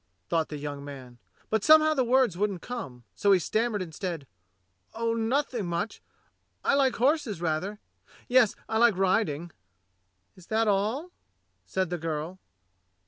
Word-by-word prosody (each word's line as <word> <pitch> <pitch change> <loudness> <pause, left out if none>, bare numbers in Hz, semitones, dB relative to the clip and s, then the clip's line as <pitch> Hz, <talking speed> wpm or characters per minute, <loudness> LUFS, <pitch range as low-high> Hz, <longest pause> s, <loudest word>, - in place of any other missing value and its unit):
thought 160 -2 +1
the 150 - -5
young 145 -1 -6
man; 130 -4 -10 0.3
but 220 -1 +1
somehow 310 0 +7
the 270 -4 +2
words 250 -5 +3
wouldn't 195 -2 -1
come, 135 - -6
so 200 - +2
he 195 - +7
stammered 215 +3 0
instead: 165 -2 -5 0.7
"Oh, 230 0 0
nothing 230 -2 0
much. 170 +6 -3 0.6
I - - +2
like 275 -2 +3
horses 260 - +1
rather; 175 +5 -2 0.5
yes, 245 -4 +4
I 220 - 0
like 235 -5 +5
riding." 175 -4 +1 0.8
"Is 185 -2 -17
that 225 0 +1
all.?" 215 - 0 0.6
said 185 -2 -1
the 175 - -2
girl. 165 +3 -4
200 Hz, 140 wpm, -28 LUFS, 165-235 Hz, 0.8 s, somehow